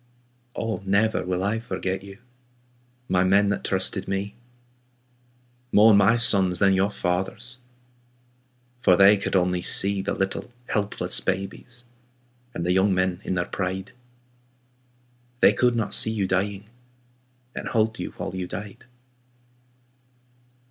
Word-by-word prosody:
Oh, 110 -4 -3
never 100 +3 +1
will 90 0 -2
I 105 +3 0
forget 95 -3 -4
you, 100 0 -12 0.9
My 90 0 +2
men 100 +2 +3
that 100 - -2
trusted 95 -1 +1
me. 95 +1 -3 1.4
More 110 +1 +6
my 100 +3 +5
sons 95 -6 +2
than 95 +1 +3
your 95 +1 +2
fathers'. 105 +7 -3 1.2
For 90 -5 +4
they 100 +1 +7
could 100 0 -3
only 90 -1 +1
see 100 +2 +1
The 95 - -3
little 95 +5 -3 0.2
helpless 100 -3 -1
babies 100 +6 -4 0.7
And 85 - -3
the 90 - +1
young 95 +1 +3
men 95 0 0
in 95 - -2
their 90 0 0
pride. 95 +1 -4 1.5
They - - +6
could 125 -1 +2
not 115 -2 -2
see - - +1
you 110 -3 -1
dying. 100 +2 -2 0.9
And - - -6
hold 110 -1 0
you - - -4
while - - -6
you 90 -1 -4
died. 105 +2 -8
95 Hz, 130 wpm, -24 LUFS, 95-105 Hz, 1.5 s, they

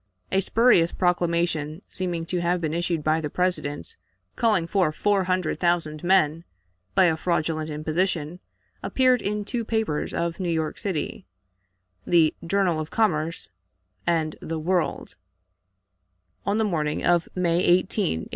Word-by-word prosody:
A 190 - +3
spurious 205 -5 +4
proclamation, 170 -2 0
seeming 175 -3 -3
to 175 +1 -2
have 175 +1 +1
been 160 -2 -2
issued 170 -2 -1
by 155 +1 +2
the 150 - -3
President, 180 - -2 0.4
calling 215 -8 +2
for 180 -2 +1
four 195 +4 +1
hundred 185 -2 -1
thousand 170 -3 0
men, 170 -3 +3 0.5
by - - +6
a 165 -2 +3
fraudulent 160 -2 -1
imposition 155 +2 -1 0.4
appeared 255 -2 +2
in 210 0 -2
two 235 +1 -2
papers 220 -9 -1
of 170 +1 -2
New 180 -2 -1
York 160 -2 -1
City 155 - -4 0.8
(the 165 -3 +4
"Journal 180 -2 +1
of 155 0 -4
Commerce" 165 - 0 0.6
and 160 -2 +1
the 165 - -4
"World") 175 +2 -1 1.3
on 200 +2 +2
the 220 - +2
morning 155 -6 -1
of 175 -1 +2
May 175 -2 +1
18, 175 -1 +5 0.5
1864. - - -10
170 Hz, 140 wpm, -25 LUFS, 155-185 Hz, 1.3 s, by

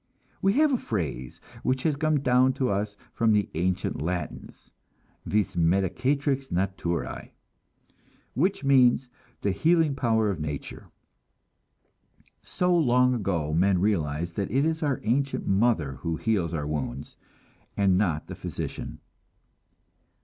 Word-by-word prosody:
We 195 +1 +3
have 295 +3 +3
a 250 - +1
phrase 70 - -4 0.2
which 130 0 0
has 155 -3 +1
come 155 0 +1
down 130 0 +3
to 130 -1 -1
us 100 +1 -2 0.2
from 115 -2 +2
the 105 -1 +2
ancient 90 -2 -1
Latins, 90 +3 -5 0.6
"vis 105 -3 0
medicatrix 125 - +1
naturae," 85 -6 -2 1.0
which 175 - 0
means 130 -2 +4 0.3
the 100 - +1
healing 160 - +2
power 110 -5 +1
of 90 - -5
nature. 75 -2 -6 1.5
So 180 0 0
long 125 -5 +4
ago 90 -9 -1
men 90 +3 +3
realized 85 -4 -1
that 100 - -1
it 135 +6 +2
is 160 0 -1
our 145 -5 0
ancient 135 +6 0
mother 95 - +1
who 85 -1 -3
heals 95 -5 0
our 75 -4 -3
wounds, 75 -5 -4 0.6
and 100 -2 +3
not 85 -6 0
the - - -8
physician. - - -6
105 Hz, 125 wpm, -26 LUFS, 85-135 Hz, 1.5 s, means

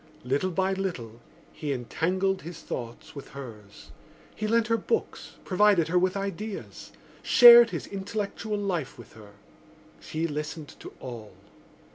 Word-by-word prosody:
Little 140 +9 0
by 190 +2 0
little 130 - -5 0.3
he 150 -2 -4
entangled 185 +9 -1
his 170 0 -9
thoughts 120 -1 -7
with 140 - -10
hers. 105 -6 -11 0.4
He 215 - -3
lent 230 +1 +2
her 230 0 +1
books, 455 - -3
provided 190 -4 +3
her 180 +1 +3
with 185 +2 0
ideas, 200 +1 -6 0.3
shared 240 -1 +9
his 170 -6 -5
intellectual 205 +2 -4
life 180 -9 -3
with 120 -3 -14
her. 105 -2 -15 0.7
She 160 +1 -3
listened 150 0 -5
to - - -10
all. 115 -4 -9
180 Hz, 135 wpm, -27 LUFS, 135-200 Hz, 0.7 s, shared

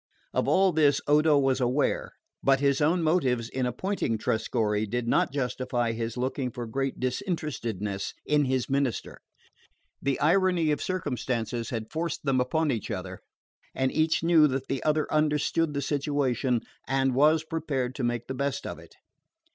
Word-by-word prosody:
Of - - 0
all 190 0 +4
this 150 -3 +3
Odo 150 +1 +4
was 135 -1 +2
aware; 125 +4 0 0.3
but 135 -1 +3
his 140 0 +2
own 165 +3 +2
motives 130 -8 +1
in 130 -1 -1
appointing 125 - -1
Trescorre 110 -1 0
did 120 +2 -2
not - - +2
justify 125 -3 -1
his 115 +1 -4
looking 130 +1 -1
for 120 0 -6
great 135 +4 -3
disinterestedness 125 - -3
in 150 -1 +3
his 130 -2 0
minister. 135 -3 -2 0.8
The 140 -1 0
irony 170 0 +3
of 150 - -1
circumstances 125 - -2
had 110 -3 -5
forced 160 -1 -3
them 130 -2 +2
upon 155 +4 +1
each 115 -5 -3
other, - - -5 0.6
and 130 0 +1
each 160 +1 +1
knew 165 -2 +6
that 135 -1 -3
the 135 - -1
other 155 0 +2
understood 150 +1 +1
the 140 - -1
situation 135 -4 0 0.3
and 135 -1 +1
was 155 +4 +4
prepared 145 -6 -2
to 135 - -5
make 120 -1 -1
the 130 - -5
best 140 +1 -2
of - - -6
it. - - -16
135 Hz, 160 wpm, -27 LUFS, 125-150 Hz, 0.8 s, knew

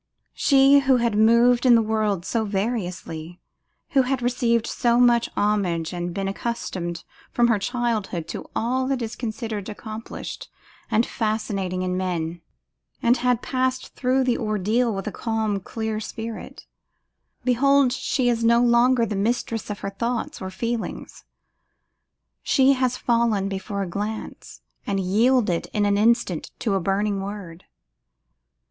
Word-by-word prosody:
She 275 0 +5
who 270 -2 +3
had 235 -3 0
moved 235 +3 +5
in 250 -2 +7
the 230 - +5
world 215 -4 0
so 230 +2 0
variously, 185 -6 -3 0.5
who 275 - +5
had 260 -1 -1
received 240 -2 +1
so 240 -1 +1
much 240 -1 +4
homage 185 -6 0
and 175 0 -3
been 195 +2 -3
accustomed 185 -5 -4 0.3
from 240 0 +3
her 225 -3 +3
childhood 215 -6 -2
to - - -6
all 260 +3 0
that 265 -3 -1
is 225 0 -5
considered 220 -3 -4
accomplished 220 +1 -7 0.4
and 225 +2 +2
fascinating 205 -5 -2
in 185 0 -1
man, 175 -2 -3 0.6
and 240 +2 +4
had 250 -1 +1
passed 255 0 -1
through 260 +1 +1
the 250 -2 +1
ordeal 215 +3 +1
with 195 -2 -4
a 215 - -3
calm 220 -3 -1
clear 220 +2 -4
spirit; 225 +1 -7 0.8
behold, 270 +1 +3
she 260 -1 0
is 235 -1 +1
no 235 +1 +5
longer 240 0 +4
the 210 - -3
mistress 225 +2 -1
of 205 - -5
her 195 - -4
thoughts 235 +3 -3
or 190 - -4
feelings; 230 +4 -5 1.2
she 270 0 +4
had 255 -2 +1
fallen 230 -5 +1
before 195 +1 -3
a - - -4
glance, 210 +5 -6 0.3
and 195 -1 0
yielded 205 0 +2
in 210 -1 +1
an 200 0 +2
instant 220 -6 +1
to 215 - -1
a 195 - +2
burning 195 +2 0
word! 195 -4 -7
220 Hz, 145 wpm, -23 LUFS, 195-240 Hz, 1.2 s, in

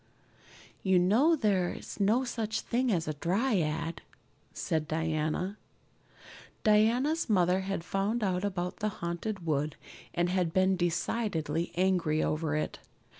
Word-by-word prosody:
"You 190 -1 +3
know 225 - +4
there 200 - +1
is - - -9
no 215 +6 +3
such 225 -3 -2
thing 250 +1 0
as 170 -5 0
a 155 - -1
dryad," 165 - 0 0.5
said 155 -1 -2
Diana. 160 +5 -1 1.0
Diana's 235 +9 +3
mother 180 -2 +3
had 190 -2 -3
found 200 +6 -1
out 185 -2 0
about 180 -3 -2
the 215 - -1
Haunted 185 0 -4
Wood 150 -1 0 0.4
and 175 0 +2
had 180 -2 0
been 190 0 +3
decidedly 170 -2 -1
angry 175 -4 +2
over 155 0 -1
it. 155 - -2
185 Hz, 125 wpm, -30 LUFS, 165-215 Hz, 1.0 s, know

